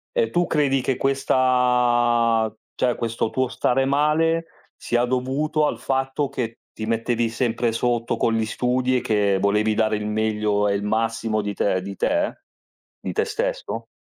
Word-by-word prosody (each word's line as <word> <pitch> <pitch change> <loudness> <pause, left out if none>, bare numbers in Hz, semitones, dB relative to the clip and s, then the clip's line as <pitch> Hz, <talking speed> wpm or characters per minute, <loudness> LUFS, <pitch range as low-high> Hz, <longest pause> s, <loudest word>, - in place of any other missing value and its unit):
E 480 -2 +2
tu 175 0 +1
credi 140 -5 +1
che 130 0 -1
questa 125 -4 +2 0.2
cioè, 125 -2 +1
questo 115 -1 -2
tuo 130 +3 0
stare 130 +1 +1
male, 155 +4 +2 0.3
sia 120 0 0
dovuto 135 +5 0
al - - -3
fatto 135 +2 -1
che 115 -3 -5
ti 110 - -5
mettevi 115 +1 0
sempre 115 0 0
sotto 120 0 -1
con 115 - +1
gli 110 0 +1
studi 125 +3 0
e - - -1
che 105 -3 +1
volevi 105 +2 +2
dare 110 0 +1
il 105 0 -3
meglio 105 -1 0
e 100 - +1
il 100 - -2
massimo 110 0 0
di 105 0 -3
te 95 -1 0
di 100 +1 -7
te? 300 - -1 0.6
Di - - -5
te 445 - +1
stesso? - - -3
120 Hz, 165 wpm, -23 LUFS, 110-135 Hz, 0.6 s, E